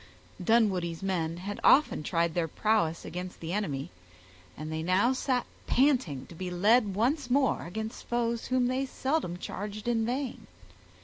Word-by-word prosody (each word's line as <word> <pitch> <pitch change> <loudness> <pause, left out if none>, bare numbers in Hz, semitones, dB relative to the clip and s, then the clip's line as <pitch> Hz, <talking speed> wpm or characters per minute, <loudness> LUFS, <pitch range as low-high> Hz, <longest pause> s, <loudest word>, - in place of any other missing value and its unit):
Dunwoodie's 185 -6 +2
men 170 -4 -1
had 200 +3 -5
often 295 - +5
tried 165 +1 0
their 170 -1 0
prowess 170 -3 0
against 180 +2 -6
the 165 +1 -4
enemy, 145 -10 -2 0.7
and 155 +1 -6
they 160 0 -2
now 185 +9 +3
sat 255 -1 0 0.2
panting 250 - +2
to - - -13
be 180 +2 -5
led 205 +3 +3
once 255 +5 +1
more 265 -7 +2
against 220 +5 -6
foes 235 -1 -1
whom 255 -1 +2
they 260 +2 0
seldom 260 - -1
charged 205 +4 -6
in 230 -2 +2
vain. 250 +2 -3
205 Hz, 150 wpm, -29 LUFS, 170-245 Hz, 0.7 s, often